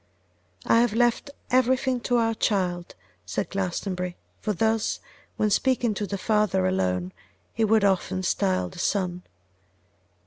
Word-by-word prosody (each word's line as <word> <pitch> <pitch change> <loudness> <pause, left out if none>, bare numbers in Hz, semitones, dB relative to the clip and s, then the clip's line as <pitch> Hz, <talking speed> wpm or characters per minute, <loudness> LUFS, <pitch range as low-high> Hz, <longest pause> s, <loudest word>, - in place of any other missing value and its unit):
'I 230 - +4
have 235 -2 +2
left 240 +4 +2 0.2
everything 255 0 +2
to 245 +1 +1
our 225 -1 +2
child,' 180 -5 -1 0.3
said 90 +1 -3
Glastonbury; 180 -1 -3 0.2
for 215 - -2
thus, 220 +3 0 0.4
when 215 -1 +1
speaking 245 0 +2
to 205 0 -3
the 200 - -3
father 210 - +1
alone, 95 -1 0 0.4
he 225 - 0
would 220 -1 +4
often 190 -1 +1
style 90 - +1
the 130 - -11
son. 180 -2 -1
200 Hz, 135 wpm, -25 LUFS, 175-225 Hz, 0.4 s, I